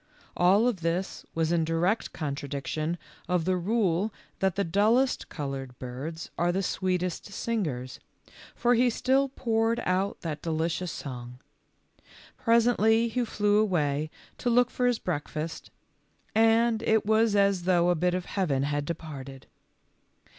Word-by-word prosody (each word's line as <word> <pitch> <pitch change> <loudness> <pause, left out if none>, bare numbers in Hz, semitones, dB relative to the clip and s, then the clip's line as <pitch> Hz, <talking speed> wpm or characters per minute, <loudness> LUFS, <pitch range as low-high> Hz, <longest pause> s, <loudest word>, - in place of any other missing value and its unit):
All 195 +6 +4
of 215 -8 -1
this 170 +3 -2
was 165 0 +1
in 170 -1 +2
direct 170 +7 0
contradiction 150 +2 -3 0.3
of 180 -2 +1
the 185 0 +2
rule 195 0 +1 0.3
that 190 -2 +1
the 200 - +1
dullest 220 +9 +2
colored 135 -4 -5
birds 135 +6 -6
are 175 +1 +3
the 190 +2 -1
sweetest 180 -1 -1
singers, 170 - -3 0.6
for 245 +1 +3
he 245 +1 +4
still 265 +3 +2
poured 230 -3 0
out 190 +2 0
that 155 -3 -4
delicious 165 +2 -1
song. 125 -2 -7 1.0
Presently 230 -1 +3
he 245 +2 0
flew 210 -2 +2
away 155 -7 +1 0.3
to 245 - 0
look 245 +1 +4
for 250 - +1
his 245 -2 +2
breakfast, 155 -2 -4 0.6
and 225 0 +4
it 220 -2 +2
was 220 0 +3
as 200 -3 +2
though 175 -1 +4
a - - +2
bit 180 +2 +1
of 180 -1 -3
heaven 150 -9 0
had 145 0 -1
departed. 140 -5 -7
180 Hz, 140 wpm, -28 LUFS, 160-220 Hz, 1.0 s, All